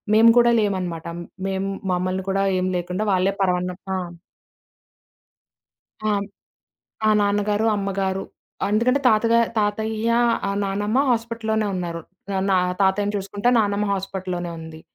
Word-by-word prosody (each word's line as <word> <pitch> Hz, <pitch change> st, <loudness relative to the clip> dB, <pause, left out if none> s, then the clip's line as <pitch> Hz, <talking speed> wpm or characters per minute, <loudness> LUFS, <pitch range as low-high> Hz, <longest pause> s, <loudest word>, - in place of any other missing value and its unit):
మేము 225 Hz, +1 st, +7 dB
కూడా 240 Hz, 0 st, +5 dB
లేమనమాట. 185 Hz, -6 st, -2 dB, 0.4 s
మేము 195 Hz, 0 st, -2 dB, 0.2 s
మమ్మల్ని 185 Hz, +1 st, -1 dB
కూడా 195 Hz, 0 st, +1 dB, 0.2 s
ఏం 185 Hz, -, 0 dB
లేకుండా 180 Hz, +3 st, -3 dB
వాళ్ళే 185 Hz, +1 st, +2 dB
పరవాన్నం 180 Hz, -1 st, 0 dB, 0.2 s
ఆ! -, -, -1 dB, 2.1 s
ఆ! -, -, +2 dB, 1.0 s
ఆ! -, -, +5 dB
నాన్నగారు, 205 Hz, +1 st, +1 dB
అమ్మగారు. 195 Hz, -1 st, -2 dB, 0.5 s
ఎందుకంటే 250 Hz, +6 st, +2 dB
తాతగా 230 Hz, +1 st, +3 dB, 0.2 s
తాతయ్య 220 Hz, +2 st, -1 dB, 0.4 s
ఆహ్, 200 Hz, -, -1 dB
నానమ్మ 205 Hz, +4 st, 0 dB
హాస్పిటల్లోనే 225 Hz, -2 st, -1 dB
ఉన్నారు. 170 Hz, -2 st, -3 dB, 0.3 s
ఆహ్, 190 Hz, 0 st, 0 dB
నా 190 Hz, -, +4 dB, 0.3 s
తాతయ్యని 205 Hz, +2 st, +1 dB
చూసుకుంటా 200 Hz, +3 st, -2 dB
నానమ్మ 205 Hz, -1 st, +1 dB
హాస్పిటల్లోనే 185 Hz, -2 st, -3 dB
ఉంది. 160 Hz, 0 st, -10 dB
195 Hz, 115 wpm, -22 LUFS, 185-215 Hz, 2.1 s, మేము